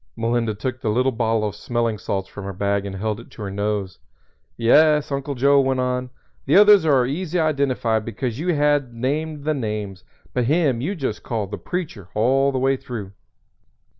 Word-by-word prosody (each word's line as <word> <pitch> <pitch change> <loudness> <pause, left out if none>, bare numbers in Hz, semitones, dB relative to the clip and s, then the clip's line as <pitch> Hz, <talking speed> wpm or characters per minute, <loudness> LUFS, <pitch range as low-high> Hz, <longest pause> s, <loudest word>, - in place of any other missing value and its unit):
Melinda 115 -1 0
took 130 +3 -4
the 115 - -1
little 125 +5 +2
bottle 115 -2 0
of 105 - -5
smelling 115 0 -2
salts 95 0 -3
from 100 - -9
her 100 - -5
bag 100 +1 -1
and 95 - -6
held 105 +2 -2
it 120 - -13
to 110 - -9
her 100 - -4
nose. 100 -1 -2 0.6
"Yes," 150 +5 +4
Uncle 140 +1 -3
Joe 140 +3 +4
went 130 -1 0
on, 125 0 -1 0.4
"the 145 - +3
others 205 -4 +7
was 130 -4 +4
easy 175 +5 -2
identified 135 -8 +1
because 115 +2 -4
you 175 +1 0
had 145 -4 +1
named 145 +5 -2
the 155 +1 +1
names; 105 -7 -4 0.3
but 125 -2 +1
him 140 -4 +2
you 185 +10 -2
just 130 - -3
called 105 -4 -3
'The - - -5
Preacher' 145 - -5
all 135 +6 +3
the 135 - -2
way 135 +1 +2
through. 110 -7 -7
125 Hz, 190 wpm, -22 LUFS, 110-140 Hz, 0.6 s, others